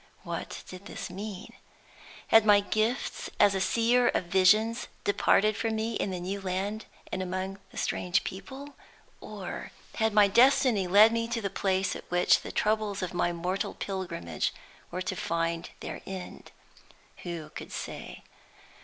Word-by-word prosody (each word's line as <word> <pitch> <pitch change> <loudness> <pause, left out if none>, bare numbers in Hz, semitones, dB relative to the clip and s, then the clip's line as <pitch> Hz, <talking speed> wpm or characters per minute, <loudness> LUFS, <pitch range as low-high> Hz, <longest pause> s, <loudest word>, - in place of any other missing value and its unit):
What - - -5
did 185 +2 -10
this - - -6
mean? 195 0 -7 0.8
Had 225 -1 +7
my 205 -1 +6
gifts 215 +5 -1
as 205 -1 +6
a 190 - -1
seer 235 +4 +3
of - - +1
visions 200 +6 +3 0.2
departed 210 +1 +3
from 225 0 -1
me 220 +1 -1
in 205 - -1
the 185 -1 -3
new 195 +3 -4
land 195 +3 -3 0.3
and 185 - -2
among 185 +1 -3
the - - -14
strange 180 +2 0
people? 265 +10 -8 0.5
Or - - -7 0.3
had 220 -1 +2
my 210 -1 +6
destiny 240 -2 +4
led 205 +5 +7
me 230 0 0
to 235 0 -2
the 200 -4 -3
place 195 -1 0
at - - -10
which 175 0 +4
the - - -7
troubles 210 -2 0
of 185 - -4
my 175 0 +1
mortal 180 +3 -2
pilgrimage 180 - -3 0.3
were 185 +1 -4
to 185 +1 -3
find 165 -1 -2
their - - -6
end? 190 -1 -8 0.7
Who 170 -3 -6
could - - -9
say? - - -7
195 Hz, 155 wpm, -29 LUFS, 185-220 Hz, 0.8 s, Had